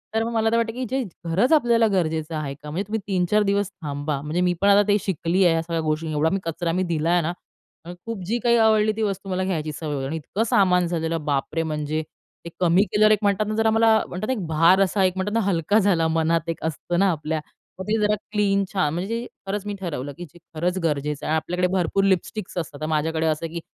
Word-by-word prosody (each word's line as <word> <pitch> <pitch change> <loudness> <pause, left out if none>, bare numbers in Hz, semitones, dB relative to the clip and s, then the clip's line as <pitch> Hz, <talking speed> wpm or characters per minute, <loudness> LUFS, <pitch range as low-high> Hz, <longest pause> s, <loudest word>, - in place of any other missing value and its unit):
तर 225 - +2
मग 230 - -3
मला 225 -1 +2
तर 230 - +2
वाटतं 230 -1 0
की 255 - -4
जे 265 0 0 0.2
खरच 190 - +1
आपल्याला 235 -6 +4
गरजेचं 160 -3 -1
आहे 145 -3 -3
का? 150 +1 -11
म्हणजे 170 +6 -2
तुम्ही 220 +1 -2
3-4 195 +2 +2
दिवस 200 -1 0
थांबा, 145 -6 -4
म्हणजे 155 +4 -2
मी 180 -1 +2
पण 200 - +4
आता 205 +1 +5
ते 205 - +4
शिकली 185 +1 0
आहे, 170 - +5
या 165 - +1
सगळ्या 165 0 -2
गोष्टी 155 +1 -2
एवढा 155 +1 +1
मी 195 - 0
कचरा 165 +1 -2
मी 185 +2 0
दिला 160 +2 0
आहे 175 0 +3
ना 165 +2 -1 0.5
आणि 175 +1 -8
खूप 230 -3 -4
जी 230 +6 0
काही 235 -1 +4
आवडली 215 -1 +4
ती 225 - -2
वस्तू 195 -1 -3
मला 185 0 -1
घ्यायची 160 -5 -2
सवय 155 -3 -4
वगैरे 135 -1 -3
आणि 160 - -4
इतकं 195 +8 -2
सामान 180 -3 +3
झालेलं, 165 -2 -2
बापरे! 150 +3 -1
म्हणजे 155 0 -2 0.4
ते - - -5
कमी 180 +2 +4
केल्यावर 215 +1 +4
एक 215 - +4
म्हणतात 205 +1 +1
ना 215 - -2
जरा 225 0 +2
मला 225 +1 +4 0.2
म्हणतात 185 +4 -5
ना 260 - +1
एक 205 -9 -4
भार 165 +4 +4
असा 195 +1 +2
एक 185 -1 +2
म्हणतात 190 +2 -2
ना 230 - +2
हलका 185 +5 +2
झाला 175 -5 +2
मनात 165 +1 0
एक 165 - -4
असतं 175 +3 -2
ना 195 -1 +4
आपल्या. 155 -1 -2 0.4
मग - - -3
ते 220 - +1
जरा 210 0 +3 0.2
क्लीन 200 -2 +2
छा 180 -6 +1
म्हणजे 200 +9 -3 0.2
खरंच 205 +1 -3
मी 205 - -3
ठरवलं 145 -7 -4
की 175 - -7
जे 175 - -18 0.2
खरंच 180 +4 -1
गरजेचं 150 -2 -1
आहे - - -1
आणि - - +3
आपल्याकडे 180 +3 0
भरपूर 190 +1 +1
लिपस्टिक्स 195 0 -1
असतात 150 -3 -4
तर - - -1
माझ्याकडे 160 +1 0
असं 160 +1 0
आहे 165 - -7
की 170 - -4
180 Hz, 250 wpm, -23 LUFS, 160-205 Hz, 0.5 s, आता